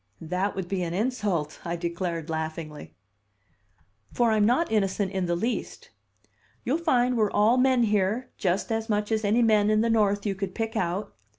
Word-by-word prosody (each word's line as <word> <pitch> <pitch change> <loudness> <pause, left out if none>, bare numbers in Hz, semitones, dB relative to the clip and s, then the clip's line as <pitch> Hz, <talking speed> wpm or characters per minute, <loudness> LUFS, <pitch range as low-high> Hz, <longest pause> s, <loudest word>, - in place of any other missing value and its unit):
"That 180 +5 -2
would 190 -2 -4
be 190 0 -2
an 170 -1 -3
insult," 205 - -1
I 170 0 -3
declared 170 -1 -3
laughingly. 160 - -5 1.2
"For 235 -2 +2
I'm 215 -1 +3
not 260 +6 +1
innocent 195 -2 0
in 190 -2 -2
the 175 - +1
least. 230 +8 -4 0.7
You'll 285 +7 +1
find 250 -7 +2
we're 215 -3 +2
all 215 +5 +3
men 255 -1 +4
here, 210 +3 0
just 190 +3 -1
as 225 0 -2
much 210 0 0
as 220 0 0
any 220 +4 +3
men 215 -2 +4
in 215 0 +3
the 230 0 +1
North 205 -2 +2
you 200 - 0
could 195 -1 -5
pick 225 0 -3
out. 185 0 -2
205 Hz, 180 wpm, -26 LUFS, 180-225 Hz, 1.2 s, men